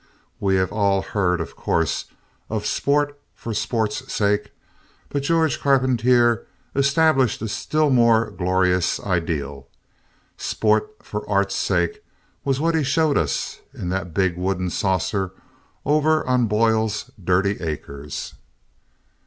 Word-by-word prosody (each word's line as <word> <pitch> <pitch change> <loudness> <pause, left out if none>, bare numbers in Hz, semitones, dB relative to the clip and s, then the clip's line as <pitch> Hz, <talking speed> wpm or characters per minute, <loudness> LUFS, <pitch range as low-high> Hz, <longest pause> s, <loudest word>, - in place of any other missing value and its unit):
We 95 -1 +2
have 95 -1 +1
all 100 -2 +2
heard, 90 -4 0
of 80 - -5
course, 80 -2 0 0.4
of - - -2
sport 145 0 0
for 115 - -5
sport's 110 0 -2
sake 105 0 +1 0.6
but 140 - -1
Georges 160 0 +2
Carpentier 125 -3 +3 0.3
established 140 -2 +3
a - - -1
still 155 +7 0
more 115 -2 +4
glamorous 90 -1 +1
ideal. 75 -7 -2 0.7
Sport 110 - +1
for - - -6
art's - - +2
sake 425 0 0 0.4
was 135 -1 0
what 165 +2 +1
he 160 -2 +2
showed 145 +2 +2
us 70 -4 -1 0.2
in 90 - -4
the 95 +1 -1
big 90 0 -1
wooden 90 -1 -1
saucer 95 0 0 0.5
over 155 +2 +3
on 125 -2 +2
Boyle's 110 0 +1
dirty 95 +3 +2
acres. 75 -3 -5
105 Hz, 120 wpm, -22 LUFS, 90-135 Hz, 0.7 s, more